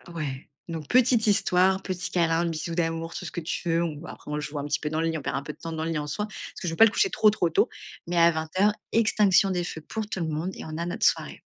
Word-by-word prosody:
Ouais. 140 -4 -4 0.2
Donc, 160 -3 -5
petite 245 -3 +4
histoire, 190 -1 +3
petit 185 -1 -4
câlin, 170 -1 +2
bisou 165 0 -3
d'amour, 165 -1 -1
tout - - -5
ce - - -5
que 175 - -4
tu 170 +1 -3
veux, 165 +1 +2
on 155 -1 -4
après, - - -10
on 150 0 -2
joue 150 0 -4
un 140 - -4
petit 145 -1 0
peu 150 - -2
dans 155 +1 -2
le 165 - +1
lit, 160 -1 -1
on - - -6
perd - - -2
un 140 - -4
peu 150 - -6
de - - -24
temps 165 - -7
dans 160 0 -3
le 165 - -2
lit 160 - -1
en 150 0 -3
soi, 210 +8 -2
parce 210 - -9
que 175 - -3
je 165 - -1
veux - - -3
pas 225 - +7
le 220 - +3
coucher 390 - +2
trop 215 -7 +4
trop 180 -5 +1
tôt. - - +2 0.4
Mais 175 0 -2
à 170 0 +7
20:00, 175 +6 +1 0.2
extinction 210 -3 +4
des 180 -2 0
feux 160 -2 -6
pour 220 +7 -4
tout 190 - -4
le 165 - -1
monde 160 +4 -2
et - - -8
on 155 0 -6
a 170 - -2
notre 175 - -1
soirée. - - +1
165 Hz, 305 wpm, -26 LUFS, 155-190 Hz, 0.4 s, pas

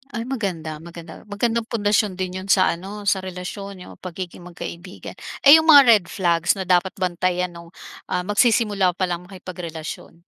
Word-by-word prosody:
Ay 230 - -2
maganda 175 -10 -3
maganda, 170 -1 -10 0.2
magandang 230 +2 0
pundasyon 205 -2 +1
din 185 -1 -3
'yun 195 - -11
sa 185 - +4
ano 185 +4 -8 0.2
sa - - +1
relasyon, 190 +2 -7
'yung - - -11
pagiging 180 0 -7
magkaibigan. 175 +1 -9 0.3
Ay 280 - +10
'yung 320 - +1
mga 285 -1 +10
red 210 -6 +6
flags 170 -3 +2
na 190 - -2
dapat 180 +1 +2
bantayan 180 0 -1
nung, 170 0 -12 0.4
ah, 180 - +1
magsisimula 210 -3 +3
palang 180 -2 -1
makipagrelasyon? 180 -4 -8
185 Hz, 160 wpm, -22 LUFS, 175-205 Hz, 0.4 s, Ay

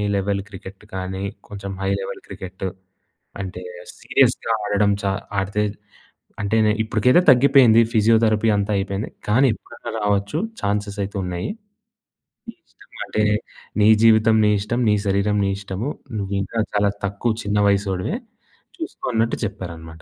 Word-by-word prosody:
Level 100 0 0
cricket 95 0 -11
కానీ, 95 0 -4 0.3
కొంచెం 100 -1 -7
high 95 - 0
level 95 - -6
క్రికెట్ట్. 95 +1 -7 0.8
అంటే 90 -2 -6 0.4
సీరియస్‌గా 115 - +2
ఆడడం 105 0 +2
చ - - -8 0.4
ఆడితే 100 +2 -1 0.8
అంటే 105 +1 0
నె 105 - +4
ఇప్పటికైతే 115 +7 +3
తగ్గిపోయింది. 125 -3 +6
ఫిజియోథెరపీ 110 0 +3
అంతా 100 +1 -1
అయిపోయింది. 100 +1 -3 0.2
కానీ 125 +6 +4
ఎప్పుడన్నా 105 - -9
రావచ్చు. 100 +5 0 0.2
ఛాన్సెసైతున్నాయి. 100 -3 -2 1.0
నీ - - -7
ఇష్టం - - -18
అంటే 105 - 0 0.6
నీ 105 - +6 0.2
జీవితం, 110 0 +5
నీ - - +4
ఇష్టం. 115 +4 -2
నీ - - +4
శరీరం, 100 +1 +1
నీ - - +1
ఇష్టము. 100 +6 -4 0.3
నువ్వింకా 100 +2 -2
చాలా 105 -1 +3 0.2
తక్కువ 100 +4 -1
చిన్న 105 0 -1
వయసోడివే. 100 - 0 0.6
చూసుకో" 325 -2 -6
అన్నట్టు 115 +1 +1
చెప్పారన్నమాట. 85 -5 -7
100 Hz, 125 wpm, -22 LUFS, 95-110 Hz, 1.0 s, తగ్గిపోయింది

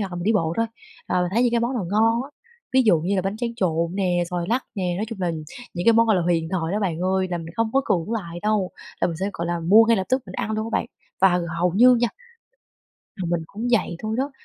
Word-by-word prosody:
hoặc 200 - -2
là - - -4
mình 175 - -4
đi 220 - +3
bộ 165 -6 +1
thôi, 230 - +1 0.4
à, 180 - +1
mình 180 -1 0
thấy 235 - +3
những 245 - +3
cái 235 - +2
món 240 +3 -1
nào 225 -6 -2
ngon 225 +3 +3
á, 275 - -10 0.4
ví 260 0 +5
dụ 205 -8 +4
như 185 +5 -1
là 185 - +1
bánh 195 +2 -2
tráng 235 0 -3
trộn 170 -4 0
nè, 180 -3 +1
xoài 175 -1 -2
lắc 245 +4 0
nè, 180 -4 -1
nói 210 - -1
chung 225 -4 -7
là 180 -2 0 0.4
những 175 0 -3
cái 230 - +8
món, 230 0 +4
gọi 215 -3 +4
là, 180 - +1
huyền 165 -1 0
thoại 170 -2 -1
đó 210 - 0
bạn 175 -6 -1
ơi, 185 +1 +1
là 175 - -1
mình 165 0 -8
không 225 -1 +1
có 270 - +4
cưỡng 180 +4 0
lại 175 -7 -4
đâu, 210 -3 +1 0.3
là - - +3
mình 165 - -4
sẽ, 195 +4 -2
gọi 170 - -4
là, 170 0 -2
mua 200 +7 +6
ngay 230 0 +3
lập 190 - -1
tức 260 0 +1
mình 185 - -9
ăn 215 - -3
luôn 220 0 -2
á - - +4
bạn, - - -4 0.3
và 180 -2 +4 0.2
hầu 180 +1 +2
như 250 +6 +6
nha 240 0 +2 1.1
là 190 - -4
mình 170 -1 0
cũng 220 +8 -5
vậy 180 -6 +1
thôi 215 0 -2
đó. 275 +2 0
195 Hz, 290 wpm, -23 LUFS, 175-225 Hz, 1.1 s, cái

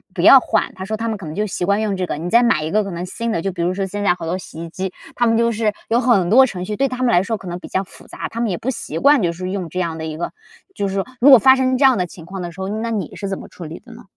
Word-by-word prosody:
不 - - -1
要 - - +9
换， - - -1
他 190 0 -6
说 220 +2 -2
他 230 +1 -3
们 220 -2 -2
可 195 - -9
能 155 +1 -6
就 210 +1 0
习 185 -3 -3
惯 200 +3 +1
用 205 -3 -1
这 185 - -1
个。 - - -3
你 170 +3 -4
再 235 +4 +5
买 225 -10 +2
一 155 - -3
个 215 +1 +2
可 195 - -6
能 175 +1 -4
新 230 +5 -3
的， 170 - -1
就 195 - -2
比 175 -2 -5
如 180 +2 +1
说 195 0 -2
现 205 +2 -4
在 195 - +4
好 175 - -7
多 175 +3 -2
洗 165 -3 -9
衣 170 - -7
机， 190 +2 -4 0.2
它 240 - +2
们 225 0 +3
就 235 0 +2
是 215 -1 0 0.2
有 235 +2 +3
很 200 -9 +3
多 260 +4 +7
程 185 -7 -5
序， 210 +2 -3
对 275 +4 +1
他 255 -1 -5
们 255 - +3
来 175 -1 +4
说 225 0 -2
可 190 - -11
能 175 +1 -5
比 - - -10
较 190 - -1
复 - - -14
杂， - - -6
他 230 - -6
们 235 -2 0
也 175 - -2
不 260 - -4
习 165 - -4
惯 285 -3 +5
就 170 -2 +1
是 185 +2 -5
用 185 -4 -4
这 185 - -4
样 165 -2 -2
的 160 - -5
一 155 -1 -5
个 175 - -3 0.4
就 200 - -1
是 190 - -4
说 195 - -1
如 275 +4 +6
果 260 - +11
发 265 +3 +6
生 260 -1 +1
这 275 - +1
样 260 -4 +5
的 180 - 0
情 165 -2 -12
况 190 +2 -7
的 175 -1 -5
时 190 +3 -10
候， 190 - -3
那 220 +2 -3
你 200 -8 -3
是 200 - -5
怎 195 - -3
么 - - -10
处 180 - -11
理 160 +2 -8
的 245 - -16
呢？ 235 - -13
195 Hz, 395 characters per minute, -19 LUFS, 180-230 Hz, 0.4 s, 果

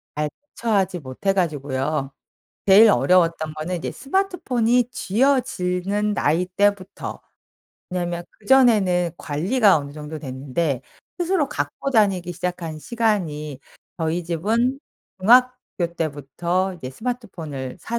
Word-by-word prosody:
잘 150 0 -1 0.3
대처하지 200 -6 0
못 130 +5 -11
해 195 - +4
가지고요. 145 -4 -1 0.6
제일 210 +3 +8
어려웠던 165 +2 +2
거는 170 +4 -3
이제 - - -4
스마트폰이 255 - +1
쥐어지는 210 -5 0
나이 165 +5 +2
때부터. 195 +1 -1 0.7
왜냐하면 175 -1 -2 0.2
그전에는 205 -8 +4
관리가 190 - +3
어느 140 0 -7
정도 150 +1 -7
됐는데 135 0 -2 0.4
스스로 345 -5 +1
갖고 275 -2 -3
다니기 195 -7 +2
시작한 175 -2 -4
시간이 155 - -1 0.4
저희 165 +2 -1
집은 225 +10 0 0.4
중학교 245 -6 +3
때부터 170 +5 -1
이제 130 -7 -7
스마트폰을 165 - -5
사 235 +1 -3
180 Hz, 285 characters per minute, -22 LUFS, 155-225 Hz, 0.7 s, 제일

